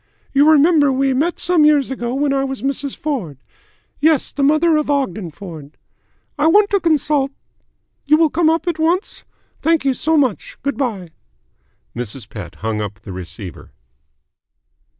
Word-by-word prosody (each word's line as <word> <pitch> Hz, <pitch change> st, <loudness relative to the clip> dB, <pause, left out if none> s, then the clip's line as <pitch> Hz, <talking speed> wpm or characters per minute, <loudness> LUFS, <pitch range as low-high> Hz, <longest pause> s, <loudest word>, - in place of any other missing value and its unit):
You 285 Hz, +2 st, +5 dB
remember 305 Hz, -1 st, +5 dB
we 270 Hz, 0 st, +1 dB
met 315 Hz, +7 st, 0 dB
some 350 Hz, -3 st, +3 dB
years 295 Hz, -3 st, +3 dB
ago 240 Hz, -1 st, -3 dB
when 280 Hz, 0 st, +1 dB
I 270 Hz, 0 st, +1 dB
was 270 Hz, -1 st, -5 dB
Mrs. 275 Hz, 0 st, -3 dB
Ford. 230 Hz, -, -4 dB, 0.6 s
Yes, 310 Hz, -2 st, +2 dB
the 285 Hz, -, -4 dB
mother 310 Hz, +4 st, +3 dB
of 300 Hz, -1 st, -1 dB
Ogden 220 Hz, -11 st, -1 dB
Ford. 160 Hz, -4 st, -11 dB, 0.6 s
I 300 Hz, -, +3 dB
want 405 Hz, +5 st, +4 dB
to 400 Hz, -, +3 dB
consult 300 Hz, -4 st, +1 dB, 0.8 s
You 305 Hz, +2 st, +5 dB
will 320 Hz, -2 st, +3 dB
come 330 Hz, -1 st, +2 dB
up 325 Hz, +2 st, 0 dB
at 335 Hz, -2 st, -1 dB
once? 340 Hz, +5 st, -1 dB, 0.4 s
Thank 325 Hz, -3 st, +1 dB
you 270 Hz, -, +3 dB
so 320 Hz, +5 st, 0 dB
much. 260 Hz, -7 st, -1 dB
Good 280 Hz, -2 st, -1 dB
bye." 210 Hz, -10 st, -3 dB, 0.9 s
Mrs. 120 Hz, -1 st, -5 dB
Pett 95 Hz, -7 st, -9 dB
hung 110 Hz, -1 st, -1 dB
up 105 Hz, +1 st, -6 dB
the 100 Hz, -, -9 dB
receiver. 90 Hz, +1 st, -9 dB
275 Hz, 160 wpm, -18 LUFS, 195-310 Hz, 0.9 s, You